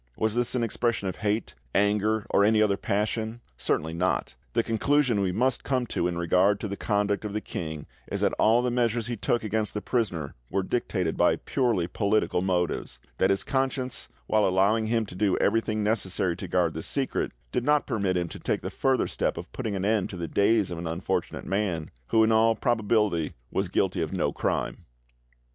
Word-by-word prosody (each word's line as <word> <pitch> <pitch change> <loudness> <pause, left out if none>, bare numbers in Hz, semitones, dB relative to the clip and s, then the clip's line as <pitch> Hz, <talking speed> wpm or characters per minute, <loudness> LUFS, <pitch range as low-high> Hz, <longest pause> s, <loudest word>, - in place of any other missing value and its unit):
Was 110 -1 +1
this 120 +1 0
an 120 - +1
expression 115 -2 0
of 85 - -6
hate, 105 +1 -1 0.2
anger, 105 +1 +2
or 100 - +4
any 110 +1 +4
other 105 -2 +3
passion? 110 +3 -2 0.2
Certainly 75 +5 -1
not; 90 -4 0 0.2
the 115 - +2
conclusion 120 0 +2
we 95 -2 +1
must 125 +7 +1
come 130 -2 0
to 85 - +1
in 90 -1 -3
regard 90 +4 +3
to - - -2
the 100 - -4
conduct 100 0 0
of 105 -1 -4
the 105 - 0
king 80 -6 -5 0.3
is - - -2
that - - +2
all 115 +3 +4
the 125 - 0
measures 120 -2 +1
he 120 0 -3
took 115 +3 0
against 110 -1 -1
the - - 0
prisoner 90 - -1 0.2
were 95 - 0
dictated 95 -6 -1
by - - +4
purely 115 -9 0
political 100 0 +1
motives; 90 -2 -1 0.2
that 95 - +4
his 95 0 +1
conscience, 130 -2 -1 0.2
while 110 -2 +3
allowing 100 +4 +2
him 115 0 +1
to 100 - -10
do 95 +1 +1
everything 110 0 +1
necessary 95 -4 0
to - - -6
guard 85 -3 +1
the 80 - -4
secret, 135 - -1 0.2
did 125 - 0
not 150 +2 +3
permit 100 -4 0
him 85 -1 -1
to - - -9
take - - -1
the - - -5
further 135 -1 +1
step - - -1
of - - -8
putting 105 -3 -3
an 95 0 -2
end 105 -2 +1
to 95 - -7
the 85 -1 -3
days 100 0 +2
of 85 - -4
an 85 - -4
unfortunate 85 +3 -2
man, 95 -6 -1 0.2
who 110 - +4
in 110 - +3
all 115 0 +4
probability 105 -8 +1 0.2
was - - -1
guilty - - +1
of - - -2
no - - 0
crime. - - -2
105 Hz, 200 wpm, -27 LUFS, 95-115 Hz, 0.3 s, or